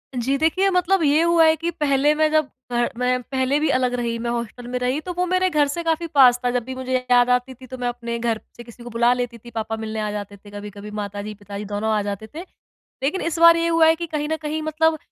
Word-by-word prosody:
जी, 265 +3 0
देखिए 350 +6 +2
मतलब 365 0 +2
ये 295 +2 +4
हुआ 335 -1 +4
है 315 0 +5
कि 335 +2 -3
पहले 295 -2 +2
मैं 310 0 +2
जब 310 -1 +3 0.3
घर 240 0 +1
मैं 250 0 +1
पहले 265 +3 0
भी 310 - +1
अलग 255 -2 +1
रही, 235 -1 -2
मैं 235 +1 -3
हॉस्टल 235 +1 -5
में 250 +1 -3
रही 250 +4 0
तो 360 +2 -6
वो 360 +1 0
मेरे 370 +1 +2
घर 300 -3 +2
से 335 +5 -4
काफ़ी 330 0 0
पास 260 -6 +5
था, 245 - +2
जब 245 -1 -1
भी 260 +2 -7
मुझे 260 0 -3 0.2
याद 245 0 +5
आती 250 +1 +1
थी 255 +1 -14
तो 255 +1 -8
मैं 245 -1 -2
अपने 235 -1 -4
घर 230 -1 0
प - - -18 0.2
से 240 - -9
किसी 235 0 -14
को 240 - -8
बुला 235 +1 +2
लेती 245 -1 -4
थी, 240 +2 -13
पापा 225 0 -3
मिलने 220 0 -5
आ 210 -1 -2
जाते 205 -1 -6
थे 205 +1 -16
कभी-कभी 205 0 -9
माताजी-पिताजी 205 0 -6
दोनों 210 +2 -2
आ 210 - +1
जाते 205 +1 -5
थे। - - -5 0.6
लेकिन 310 +8 0
इस 335 -1 -2
बार 335 0 +8
ये 335 0 +1
हुआ 330 -1 +4
है 320 - +5
कि 340 +1 -5
कहीं 300 -2 -3
न 320 - 0
कहीं 310 +1 -3
मतलब 315 +1 +1
255 Hz, 265 wpm, -22 LUFS, 235-315 Hz, 0.6 s, बार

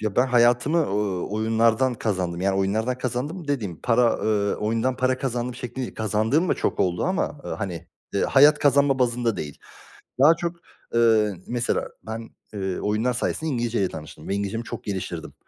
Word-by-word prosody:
Ya, 110 -2 -3
ben 125 - +4
hayatımı, 125 +6 +3
ııı, 100 - -1
oyunlardan 115 +4 +2
kazandım. 90 -6 -2
Yani 95 0 +1
oyunlardan 110 +6 0
kazandım 145 +7 -3
dediğim 105 - -2
para, 120 0 +3
eee, 105 -2 +1
oyundan 115 +4 -1
para 130 0 +1
kazandım 125 -2 -2
şeklinde 125 -1 -7
değil. - - -10
Kazandığım 110 - +1
da - - +3
çok - - -1
oldu 90 -2 +1
ama, 185 -5 -1
ııı, - - -4
hani, 85 -3 -5 0.3
eee, 100 - +1
hayat 150 +2 +6
kazanma 140 -1 +3
bazında 120 -3 +1
değil. 75 -4 -6 0.6
Daha 150 +4 +7
çok, 170 0 -3 0.4
eee, 110 -3 +4
mesela 120 0 -1 0.2
ben, 115 +1 -6 0.2
eee, 95 -3 -3
oyunlar 110 +4 0
sayesinde 160 +6 -2
İngilizceyle 115 -6 0
tanıştım 80 0 -10
ve - - -1
İngilizcemi 100 +3 -2
çok - - -7
geliştirdim 95 -3 -5
115 Hz, 165 wpm, -24 LUFS, 100-130 Hz, 0.6 s, Daha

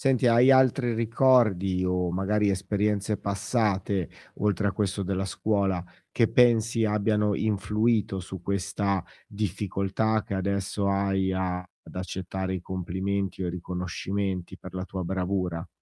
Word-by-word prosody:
Senti, 135 -2 +2
hai 120 +3 +6
altri 130 -2 +3
ricordi, 110 -6 +3
o 90 -1 0
magari 100 +3 +1
esperienze 105 +2 0
passate, 100 -2 -1 0.3
oltre 100 -1 +1
a - - -1
questo 100 -1 -1
della 95 0 -1
scuola, 95 -2 0 0.3
che 115 -3 +3
pensi 115 -2 +4
abbiano 105 0 +1
influito 105 0 +1
su 95 0 -8
questa 100 0 -1 0.2
difficoltà, 105 +1 -1
che 105 - -5
adesso 100 +1 -1
hai, 95 -1 +1
ad 90 -1 -2 0.3
accettare 95 +1 -4
i 95 - -3
complimenti 95 +1 -3
riconoscimenti 90 +1 -3
per - - -11
la 95 - -3
tua 95 -1 -5
bravura? 90 -1 -2
100 Hz, 120 wpm, -27 LUFS, 95-105 Hz, 0.3 s, hai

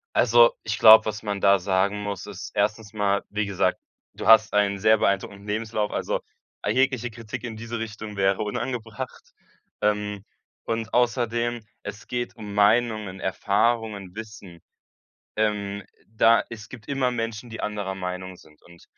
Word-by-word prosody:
Also, - - +6
ich - - -3
glaube, 110 0 +9
was 110 0 -4
man 100 -2 -3
da 100 0 +5
sagen 95 +2 0
muss, 100 -1 -4
ist 100 -2 -8
1. 105 +1 -1
mal, 100 -2 +1
wie 105 +1 -1
gesagt, 100 -2 0 0.3
du - - -6
hast 110 -1 +7
einen 100 -1 +2
sehr 110 +2 +5
beeindruckenden 100 0 -1
Lebenslauf, 105 0 -2
also, - - -2 0.4
jegliche 130 -2 +1
Kritik 115 0 -7
in 115 -3 -6
diese 115 +1 -5
Richtung 110 -1 -6
wäre 95 -1 +1
unangebracht. 110 +1 -5 0.5
Ähm, 105 -1 0 0.4
und 115 0 -3
außerdem, 120 -1 0 0.2
es 105 +1 -8
geht 120 0 -3
um 105 -2 -8
Meinungen, 105 -2 +2
Erfahrungen, 100 0 0
Wissen. 105 -6 -10 0.8
Ähm, 100 -2 -1 0.2
da 115 +1 +4
es 110 -2 -9
gibt 115 -5 -12
immer 135 -3 +1
Menschen, 115 0 -4
die 110 - -7
anderer 100 -2 -3
Meinung 90 0 -5
sind, 75 -3 -20
und 85 -1 -18
105 Hz, 150 wpm, -25 LUFS, 100-115 Hz, 0.8 s, glaube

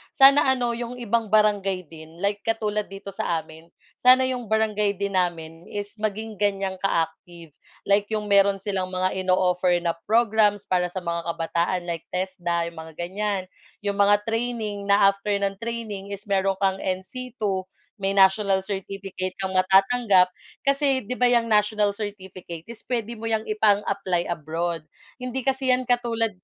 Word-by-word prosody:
Sana 275 0 +7
ano 250 -2 +2
'yong 240 +1 -4
ibang 230 0 0
barangay 200 -5 +1
din 160 +3 -12
like 200 0 +1
katulad 215 -2 0
dito 195 0 -8
sa 170 -4 -2
amin, 160 +1 -15 0.3
sana 255 +1 +6
'yong 250 -3 -2
barangay 210 -2 +1
din 200 +1 -2
namin 165 -1 -3
is 205 0 -5
maging 215 0 -3
ganyang 195 -2 0
ka-active. 165 -2 -2 0.3
Like 200 +1 +2
'yong 210 -2 -3
meron 200 -1 +4
silang 195 -3 -1
mga 185 0 -1
ino-offer 185 -1 +2
na 170 - +2 0.2
programs 215 -2 +3
para 180 -1 +1
sa 180 +1 -6
mga 170 0 -3
kabataan 170 +2 -1
like 170 -2 -5
Tesda 175 -2 -1
'yong 170 -1 -7
mga 160 -1 -10
ganyan. 190 +3 -2 0.4
'Yong 200 0 -2
mga 205 +1 +4
training 225 -3 -3
na 200 0 +6
after 200 +1 -2
ng 200 -1 -2
training 220 -4 -4
is 200 - -16
meron 195 -2 +1
kang 190 0 +2
NC 225 +7 -5
II 190 -2 -1 0.3
may 195 -1 -1
national 195 0 +4
certificate 190 -1 -5
kang 190 -1 -1
matatanggap 190 +1 +4 0.3
kasi 275 -1 +2
'di 250 +3 -5
ba 250 - +3
'yang 235 -1 +3
national 210 -1 +2
certificate 190 -5 -7
is 235 - -11
puwede 235 -2 -3
mo 225 - -7
'yang 220 -1 +1
ipang-apply 200 -4 +1
abroad. 165 0 -3 0.3
Hindi 255 +1 -4
kasi 265 0 +2
'yan 250 - +2
katulad 235 -2 +1
200 Hz, 160 wpm, -24 LUFS, 185-220 Hz, 0.4 s, Sana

